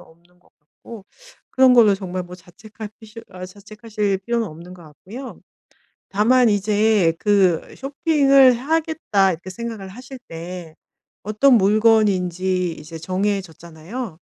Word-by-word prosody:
없는 170 +2 -22
것 - - -30
같고 195 +7 -14 0.5
그런 260 -1 +5
걸로 220 -4 +6
정말 185 -2 -5
뭐 180 0 -11
자책할 210 +5 -12
피시 220 +1 -12
아 185 -1 -9
자책하실 205 +1 -4
필요는 230 +3 -2
없는 170 +2 -11
것 180 - -14
같고요. 210 - -11 0.7
다만 235 +4 +3
이제 205 -3 +2
그 195 -6 +1
'쇼핑을 275 -2 +3
하겠다.' 270 - 0
이렇게 175 +2 -8
생각을 225 -1 -7
하실 250 +6 -11
때 165 0 -9 0.5
어떤 215 +6 +3
물건인지 190 -4 +2
이제 155 +2 -10
정해졌잖아요. 185 - -5
200 Hz, 270 characters per minute, -20 LUFS, 180-230 Hz, 0.7 s, 걸로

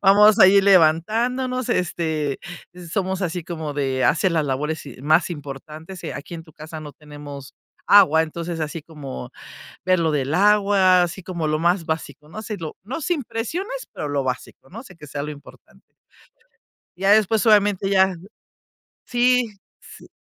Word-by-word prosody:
Vamos 205 +2 +6
a 190 - +9
ir 200 +1 +5
levantándonos, 225 +9 +2
este, 160 -5 -1 0.5
somos 190 -1 -1
así 175 -1 -2
como 160 -3 -5
de 135 -2 -1
hacer 170 +4 +2
las 160 -2 +1
labores 145 +3 -3
y - - -11
más 155 +5 +3
importantes. 155 +4 -9
Aquí 145 +4 -8
en 165 - -7
tu 160 - -19
casa 155 +1 -9
no 150 -2 -9
tenemos 145 -2 -11 0.3
agua. 160 -6 +6
Entonces, 165 +1 -5
así 155 +1 -4
como 140 -5 -8 0.5
ver 185 0 +3
lo 160 -1 +1
del 140 -1 -1
agua. 200 -1 +4
Así 175 +2 -3
como 170 -3 -4
lo 155 0 0
más 170 +2 +1
básico, 160 -1 -5
no 215 - -7
si 215 -1 -5
lo 160 -4 -7
no 265 +9 -5
sin 300 -5 -1
presiones, 370 - -4
pero 150 - -5
lo 140 -2 -1
básico, 130 +1 -6
¿no? 210 - -9
O - - -10
sea, 180 -8 -15
que 150 -2 -12
sea 140 0 -5
lo 150 - -5
importante 145 -1 -16 1.1
ya 195 +2 +3
después, 215 0 +3
obviamente 205 -2 +3
ya 190 -1 +3 0.9
Sí. 250 0 +2 0.3
Sí - - -14
170 Hz, 165 wpm, -22 LUFS, 150-200 Hz, 1.1 s, a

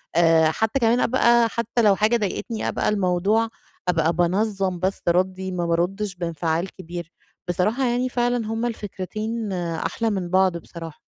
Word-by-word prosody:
آآ 165 -2 +5
حتى 220 +9 0
كمان 235 0 +3
أبقى 235 -2 +4
حتى 235 +2 -1
لو 205 -3 +5
حاجة 215 +4 +3
ضايقتني 215 +1 -3
أبقى - - 0
الموضوع 200 +3 +2 0.4
أبقى 165 -1 +2
بانظم 190 +1 0
بس 190 +2 -1
ردي، 185 +1 0
ما 175 -1 -2
بارُدش 180 +4 -1
بإنفعال 170 +1 -2
كبير. 175 -2 -7 0.4
بصراحة 210 +9 +1
يعني 245 +1 0
فعلًا 245 -2 0
هما 225 +2 -1
الفكرتين 215 +1 -4
أحلى 170 +5 -2
من 190 -4 -2
بعض 185 -1 +3
بصراحة. 165 -2 -10
190 Hz, 145 wpm, -23 LUFS, 175-225 Hz, 0.4 s, آآ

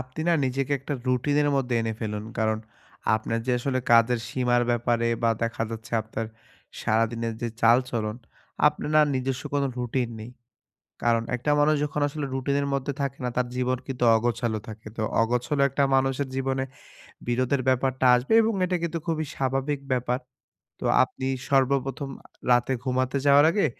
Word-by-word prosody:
আপনি 130 +4 -8
না - - +5
নিজেকে 135 +2 -1
একটা 140 +2 -4
routine 130 +3 +1
এর 145 - +2
মধ্যে 125 -2 0
এনে 115 0 -1
ফেলুন। 105 -2 -3
কারণ 110 -1 +1 0.6
আপনার 110 +1 -1
যে 130 - +2
আসলে 130 +1 -1
কাজের 115 0 +5
সীমার 120 -1 +1
ব্যাপারে 120 0 +1
বা 115 - +4
দেখা 115 0 -1
যাচ্ছে 115 +1 -8
আপনার 110 +1 -5 0.5
সারাদিনের 115 +1 0
যে 120 - 0
চালচলন 115 -2 +2 0.5
আপনার - - 0
না - - +8
নিজস্ব 130 +1 -2
কোনো 140 -1 +2
routine 125 -1 -1
নেই। 110 +3 -8 0.7
কারণ 115 -1 +3
একটা 125 +5 -2
মানুষ 155 +1 +4
যখন 150 0 -3
আসলে 145 0 -4
routine 140 +2 0
এর - - -1
মধ্যে 140 +1 -1
থাকে 140 0 -3
না - - 0
তার 125 - +1
জীবন 130 0 0
কিন্তু 125 -3 -2
অগোছালো 115 -1 -1
থাকে। 110 0 -9
তো 110 - -2 0.2
অগোছালো 125 +5 +1
একটা 140 +1 0
মানুষের 135 +1 +1
জীবনে 135 0 -1 0.6
বিরোধের 130 +2 +1
ব্যাপারটা 130 0 +1
আসবে 125 - 0
এবং 225 +1 +1
এটা 180 0 0
কিন্তু 165 0 -2
খুবই 155 -2 -1
স্বাভাবিক 135 +2 -1
ব্যাপার। 125 0 0 0.6
তো - - -7 0.2
আপনি 130 - -7 0.2
সর্বপ্রথম 135 +1 +1
আ - - -18 0.3
রাতে 120 +2 +3
ঘুমাতে 130 +1 0
যাওয়ার 140 +1 +7
আগে, 200 +4 +2
125 Hz, 165 wpm, -26 LUFS, 115-135 Hz, 0.7 s, না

